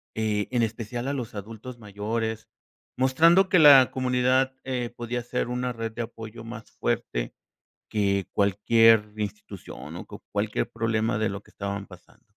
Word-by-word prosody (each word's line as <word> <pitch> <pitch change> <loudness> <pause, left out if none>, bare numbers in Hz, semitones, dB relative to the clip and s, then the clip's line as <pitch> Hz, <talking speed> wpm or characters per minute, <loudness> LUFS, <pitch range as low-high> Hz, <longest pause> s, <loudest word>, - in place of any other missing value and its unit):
Eh, 105 -2 0
en 120 -2 +2
especial 115 +3 -4
a 140 - -1
los 125 -6 -4
adultos 110 +4 -8
mayores, 110 +2 -3 0.5
mostrando 165 +9 +5
que 185 - +5
la 140 -4 +9
comunidad, 130 +1 +2
eh, 125 -2 -3
podía 120 +1 -3
ser 120 - -2
una 125 0 -2
red 115 -1 -4
de 120 - -5
apoyo 115 0 -9
más 115 -1 -9
fuerte - - -2 0.6
que 100 -2 +1
cualquier 105 +2 +4
institución 105 -2 -7
o - - -7
que - - -10
cualquier 105 +1 -1
problema 115 -1 0
de 110 - +1
lo 100 +1 -5
que - - -22
estaban 100 0 -4
pasando. 95 +5 -17
115 Hz, 155 wpm, -26 LUFS, 105-125 Hz, 0.6 s, la